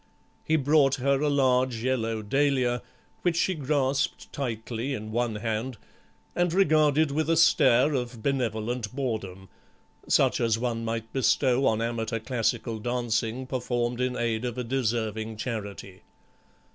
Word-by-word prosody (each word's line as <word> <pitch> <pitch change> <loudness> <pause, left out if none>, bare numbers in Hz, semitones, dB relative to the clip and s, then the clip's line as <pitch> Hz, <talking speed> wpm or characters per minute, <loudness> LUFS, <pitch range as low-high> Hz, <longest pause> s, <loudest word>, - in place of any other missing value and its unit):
He 160 - +1
brought 145 -2 +3
her 135 +1 +1
a 150 - +2
large 130 -4 +2
yellow 115 -4 -1
dahlia, 130 0 +1 0.4
which 175 -2 +1
she 185 - +2
grasped 140 -2 -1
tightly 120 0 -3
in 110 -1 -7
one 120 -1 -1
hand 110 +3 -3 0.6
and 175 -1 +1
regarded 155 -4 +3
with 155 +2 -1
a 165 - +3
stare 145 -3 +5
of 125 -4 -3
benevolent 120 -3 -2
boredom, 105 -8 -4 0.6
such - - +3
as 115 -1 +2
one 115 -1 -2
might 115 0 -4
bestow 135 0 +2
on 110 0 +1
amateur 115 0 -2
classical 115 -1 -2
dancing 120 +1 -1
performed 120 -1 -2
in 125 0 0
aid 115 -1 -1
of 125 -1 -3
a 125 - -2
deserving 110 -3 -2
charity. 100 -5 -6
125 Hz, 135 wpm, -27 LUFS, 115-135 Hz, 0.6 s, stare